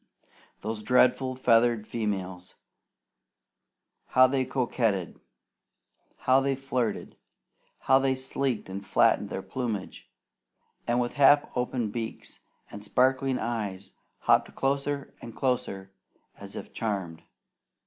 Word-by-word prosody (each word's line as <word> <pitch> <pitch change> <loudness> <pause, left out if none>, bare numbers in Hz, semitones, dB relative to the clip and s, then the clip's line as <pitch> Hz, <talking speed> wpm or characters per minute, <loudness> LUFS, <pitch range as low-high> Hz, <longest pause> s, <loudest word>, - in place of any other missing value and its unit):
Those 110 0 -4
dreadful 125 +2 +3
feathered 115 -3 +3
females! 95 -6 -4 1.5
How 130 - +6
they 130 0 +1
coquetted! 115 -8 -1 1.1
How 130 +1 +5
they 135 0 0
flirted! 130 -5 -3 0.6
How 135 - +4
they 135 -1 +1
sleeked 130 -2 -2
and 95 +1 -6
flattened - - +2
their - - -5
plumage, 115 -7 -5 0.8
and 120 +1 +2
with 120 -1 -1
half 145 +1 +6
open 125 -3 -1
beaks 115 0 -6 0.3
and 100 - -9
sparkling 130 +3 +2
eyes, 100 -5 -4 0.3
hopped - - +2
closer 140 +1 -1
and 115 - -9
closer 95 -7 -2 0.4
as - - -11
if - - -8
charmed. 95 -7 -3
120 Hz, 105 wpm, -27 LUFS, 105-130 Hz, 1.5 s, How